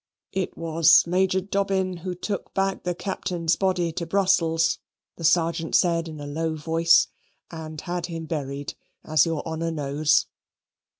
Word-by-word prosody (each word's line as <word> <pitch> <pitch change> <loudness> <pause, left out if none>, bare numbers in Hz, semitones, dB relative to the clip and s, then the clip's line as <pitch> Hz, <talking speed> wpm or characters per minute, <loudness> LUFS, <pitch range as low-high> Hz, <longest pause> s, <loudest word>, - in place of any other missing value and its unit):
"It 190 -2 -3
was 165 0 +5
Major 185 +2 +2
Dobbin 190 -1 -1
who 180 +1 -5
took 200 +3 -5
back 195 0 0
the 180 -1 -1
Captain's 175 -3 -1
body 180 -3 0
to 170 +1 -4
Brussels," 165 -3 +2 0.4
the 170 - -9
Sergeant 165 0 +2
said, 170 -2 +2
in 155 -2 -8
a 145 - -6
low 160 +2 -2
voice, 165 +2 +3 0.4
"and 155 -2 -7
had 175 -1 -3
him 165 -2 -6
buried, 145 -3 -4 0.3
as 155 +1 +3
your 165 -2 -3
honour 160 +1 -2
knows." 150 -1 +1
165 Hz, 145 wpm, -25 LUFS, 160-185 Hz, 0.4 s, was